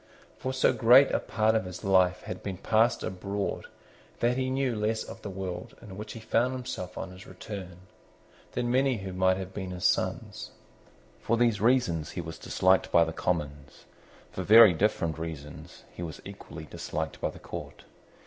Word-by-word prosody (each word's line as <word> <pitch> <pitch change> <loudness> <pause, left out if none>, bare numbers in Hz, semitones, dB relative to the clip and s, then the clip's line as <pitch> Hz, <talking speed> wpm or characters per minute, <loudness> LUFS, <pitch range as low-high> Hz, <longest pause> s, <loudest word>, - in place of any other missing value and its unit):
For 130 - -2
so 130 0 +3
great 125 +4 +6
a - - +2
part 110 0 +1
of 110 -4 +1
his 90 -1 -8
life 90 -2 +3
had 90 - -6
been 95 -2 -5
passed 110 +4 +2
abroad 100 +2 -3 0.5
that 120 +1 +2
he 130 0 -1
knew 130 -2 0
less 110 +1 -1
of - - -10
that 105 - -6
world 95 -2 -6
in 105 -5 -11
which 105 +2 -7
he 115 - -8
found 115 +3 +1
himself 105 -8 -6
on 95 - -5
his 90 +1 -12
return 95 -2 -8 0.7
than 120 0 -1
many 130 0 +2
who 95 -2 -6
might 95 0 +2
have 95 0 -6
been 95 -2 -5
his 90 0 -4
sons. - - 0 0.7
For 115 - 0
these 115 -4 +2
reasons 110 -10 +2
he - - -6
was 80 -1 -8
disliked 95 0 +2
by 85 - +6
the 80 - -3
Commons. 75 -5 -3 0.5
For - - -5
very 110 -3 +8
different 85 -4 0
reasons 80 -3 -8
he - - -9
was 85 -2 -6
equally 90 -5 -9
disliked 80 +1 -5
by - - 0
the - - -11
Court. - - -8
95 Hz, 180 wpm, -28 LUFS, 90-115 Hz, 0.7 s, very